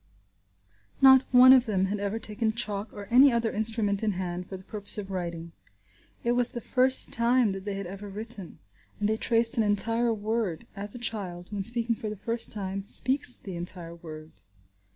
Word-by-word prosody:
Not 265 -1 +6
one 255 +1 +8
of 255 -2 +4
them 195 -3 0
had 200 +2 -3
ever 200 +2 -3
taken 220 0 -3
chalk 215 -2 -4
or 205 - -9
any 265 +3 +6
other 235 -1 -1
instrument 215 -2 +1
in 215 -2 -1
hand 180 -1 -5
for 190 - -7
the 185 - -15
purpose 205 +1 -2
of 195 -2 -6
writing. 170 -2 -5 0.7
It 235 - 0
was 245 0 +1
the 240 - -7
first 255 +3 +2
time 235 -1 +2
that 190 0 -7
they 205 -1 -3
had 195 0 -5
ever 195 +3 -9
written, 210 -2 -7 0.4
and 205 - 0
they 220 +1 0
traced 230 +1 +1
an 225 - +3
entire 230 +3 +2
word, 215 -5 -3
as 205 +2 -4
a - - -6
child, 195 -6 -4
when 200 -2 -4
speaking 235 +2 +5
for 220 -2 -6
the 210 - -7
first 230 +4 -2
time, 195 -2 -5
speaks 255 +2 +1
the 190 -3 -9
entire 170 -1 -3
word. 155 -2 -11
210 Hz, 195 wpm, -27 LUFS, 195-235 Hz, 0.7 s, one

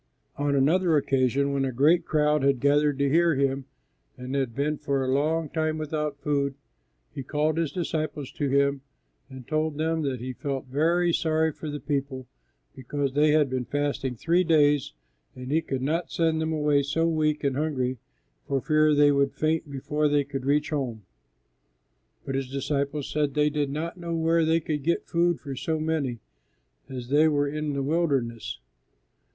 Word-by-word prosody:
On 145 0 0
another 160 +4 +3
occasion 135 0 +1
when 135 -1 0
a 135 - -1
great 155 +7 +3
crowd 150 -1 +2
had 135 -1 +2
gathered 145 +1 +2
to 140 0 +1
hear 165 +2 +3
Him 135 0 0 0.5
and 125 +1 -6
had 135 -5 -1
been 145 +2 -1
for 140 -2 -1
a - - -2
long 155 +4 +1
time 155 +1 -1
without 150 -1 -3
food, 140 -1 -1 0.6
He 145 - -5
called 150 +4 0
His 165 -4 -1
disciples 155 -5 -3
to 145 -2 -2
Him 140 0 +2 0.5
and 130 -2 -11
told 155 -1 -1
them 160 +1 0
that 135 -4 -2
He 130 +2 -5
felt 135 0 -4
very 165 +6 +1
sorry 160 0 +1
for 155 +1 -7
the 145 0 -4
people 140 -3 -3 0.5
because 135 +1 -3
they 150 +2 +4
had 150 -1 +4
been 130 -1 -3
fasting 145 -2 -2
three 170 +9 +2
days, 150 - +3 0.4
and 125 +1 -7
He 160 +2 +3
could 135 -4 -4
not 165 +5 -1
send 160 -1 +1
them 160 0 -1
away 150 -2 +2
so 160 +4 0
weak 155 -2 0
and 140 -2 0
hungry 130 -4 -1 0.5
for 135 - 0
fear 155 +1 +3
they 145 0 +5
would 140 -1 +1
faint 155 0 0
before 150 +2 -1
they 145 -1 +2
could 135 -2 -6
reach 150 +2 +1
home. 125 -8 -3 1.2
But 135 - -3
His 135 -1 -2
disciples 140 +1 -2
said 150 -2 -1
they 150 0 +3
did 145 -1 -1
not 160 +5 -4
know 170 -1 -3
where 165 0 +2
they 165 +1 +2
could 150 -1 -3
get 170 +5 0
food 170 0 +1
for 140 -3 -6
so 155 +5 -2
many, 155 -7 -2 0.7
as 125 -2 -7
they 150 +3 +5
were 145 -2 +1
in 150 0 -3
the 140 -1 -1
wilderness. 135 -7 -1
145 Hz, 180 wpm, -26 LUFS, 135-155 Hz, 1.2 s, they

